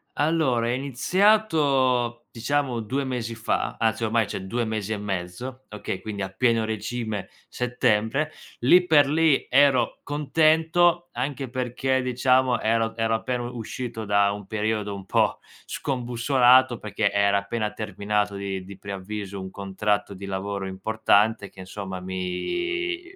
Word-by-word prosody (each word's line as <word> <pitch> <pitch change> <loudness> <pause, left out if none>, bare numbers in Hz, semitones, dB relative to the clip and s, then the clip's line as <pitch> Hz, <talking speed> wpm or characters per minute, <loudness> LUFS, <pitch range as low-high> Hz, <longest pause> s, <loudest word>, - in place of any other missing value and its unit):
Allora, 145 -7 +1
è - - +1
iniziato, 135 - +2
diciamo, 125 0 -1
2 135 +6 -2
mesi 120 -3 -3
fa, 115 0 -2
anzi 115 0 +1
ormai 110 -1 +1
cioè 100 - -5
2 120 +4 -1
mesi 110 -1 -3
e 105 - -1
mezzo, 100 +7 -5
okay? 100 -2 -5
Quindi 100 -1 -5
a 95 - -1
pieno 115 +1 +1
regime, 110 -1 -4 0.2
settembre. 125 +4 0 0.3
Lì 180 +9 +5
per 145 -4 +5
lì 160 -2 +3
ero 130 -3 +3
contento 160 +4 +2
anche 135 +1 -3
perché, 130 +1 -1
diciamo, 125 0 +2
ero 115 0 +1
ero 115 0 +1
appena 125 +1 -2
u 125 - -10
uscito 115 0 -5
da 100 -1 +2
un 105 -1 -8
periodo 105 -1 -1
un 95 -1 -9
po' - - +1 0.3
scombussolato, 125 0 +3
perché 105 -1 -1
era 100 0 +2
appena 105 +1 -2
terminato 105 -1 -2
di 95 -1 -4
di 100 0 -10
preavviso 100 0 -6
un 95 0 -6
contratto 100 +1 -2
di 100 +1 -8
lavoro 100 0 -3
importante 105 +2 +1
che, 95 - -12
insomma, 95 -1 -6
mi 350 - -3
115 Hz, 140 wpm, -25 LUFS, 100-130 Hz, 0.3 s, Lì